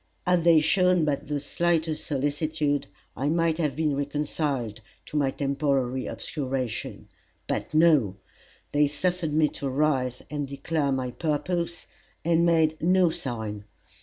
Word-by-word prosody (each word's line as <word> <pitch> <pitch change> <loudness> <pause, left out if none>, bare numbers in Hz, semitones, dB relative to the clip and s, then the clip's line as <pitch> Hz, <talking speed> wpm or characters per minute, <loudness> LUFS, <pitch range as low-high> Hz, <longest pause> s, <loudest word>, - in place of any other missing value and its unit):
Had 180 -2 +3
they 165 -2 +7
shown 180 +1 +3
but 145 -2 -1
the 145 0 -1
slightest 160 +1 0
solicitude, 145 +1 -1 0.3
I 135 +4 -1
might 165 0 +1
have 150 -5 0
been 150 -2 +1
reconciled 140 -5 -2 0.2
to - - -10
my 140 -2 +2
temporary 135 -2 0
obscuration. 130 -5 -4 0.4
But - - -3
no! 150 - +4 0.5
they 145 0 +4
suffered 170 +2 -1
me 155 0 +4
to 140 - -4
rise 130 -3 0
and 145 -1 -3
declare 140 +1 -1
my 130 -2 -1
purpose, 170 +4 -2 0.4
and 170 0 +3
made 160 -2 +2
no 180 +1 +4
sign. 110 -7 -4
150 Hz, 135 wpm, -26 LUFS, 135-165 Hz, 0.5 s, they